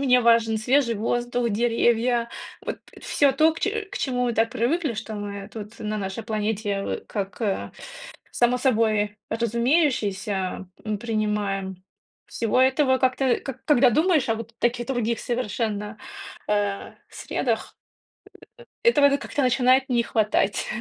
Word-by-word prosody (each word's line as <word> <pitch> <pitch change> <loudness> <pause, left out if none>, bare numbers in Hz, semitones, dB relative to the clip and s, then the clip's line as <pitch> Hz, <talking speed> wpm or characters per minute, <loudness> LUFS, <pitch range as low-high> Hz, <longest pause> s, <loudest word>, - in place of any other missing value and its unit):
мне 250 -3 +4
важен 230 -1 +4
свежий 245 +2 +2
воздух, 240 +2 -1
деревья, 235 +1 +2 0.3
вот - - -4 0.2
всё 285 -2 +2
то, 310 +4 +4
к 320 - -10
че 435 +2 -1
к - - -3
чему 250 -2 0
мы 240 - 0
так 225 +1 +2
привыкли, 270 +4 0
что 220 +1 -6
мы 200 -1 -6
тут 215 0 -9
на 215 0 -2
нашей 195 +2 -4
планете, 215 -2 -1
в - - -3
как, 200 0 -5
э, 200 -3 -1 0.6
само 245 +1 +2
собой 220 -5 +1
разумеющееся, 225 - 0 0.2
м, 215 -1 -2
принимаем. 205 -4 -2 0.4
Всего 230 +2 0
этого 260 0 +3
как-то, 260 0 +2
к 270 - -7
когда 270 -5 +5
думаешь 310 - +2
о 225 - +2
вот 230 0 -8
таких 240 0 0
других 235 -3 -1
совершенно, 215 -3 -2 0.5
э, 205 -1 -1 0.2
средах, - - -3 1.1
э - - +7
этого 285 -8 +4
как-то 285 - -3
начинает 260 +1 +3
не 240 -2 +2
хватать. 215 -3 +1
230 Hz, 140 wpm, -24 LUFS, 210-255 Hz, 1.1 s, э